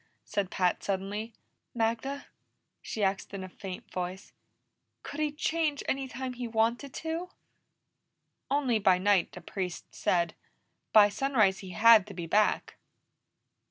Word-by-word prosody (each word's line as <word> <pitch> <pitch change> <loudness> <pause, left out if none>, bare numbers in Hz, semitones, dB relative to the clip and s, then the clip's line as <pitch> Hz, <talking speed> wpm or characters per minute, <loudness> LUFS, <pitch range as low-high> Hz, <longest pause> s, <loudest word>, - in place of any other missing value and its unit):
said 200 -3 -1
Pat 180 -2 0
suddenly. 200 +3 -3 0.4
"Magda," 235 +5 -1 0.6
she 215 - -3
asked 195 +1 -1
in 190 - -5
a - - -6
faint 185 0 -8
voice, 180 +1 -5 0.7
"could 285 - -7
he 305 -1 +1
change 305 -1 -1
any 270 0 -1
time 260 0 -5
he 245 -1 -5
wanted 230 +4 0
to?" 325 +3 -3 1.2
"Only 265 -5 +2
by 190 -3 +4
night, 195 -1 +2
the 180 - -10
Priest 180 0 -5
said. 170 -2 +1 0.6
By 210 -2 +8
sunrise 215 -4 +2
he 190 - -9
had 225 -3 +7
to 200 - -9
be 170 -1 -4
back." 210 +5 +1
215 Hz, 135 wpm, -29 LUFS, 190-265 Hz, 1.2 s, By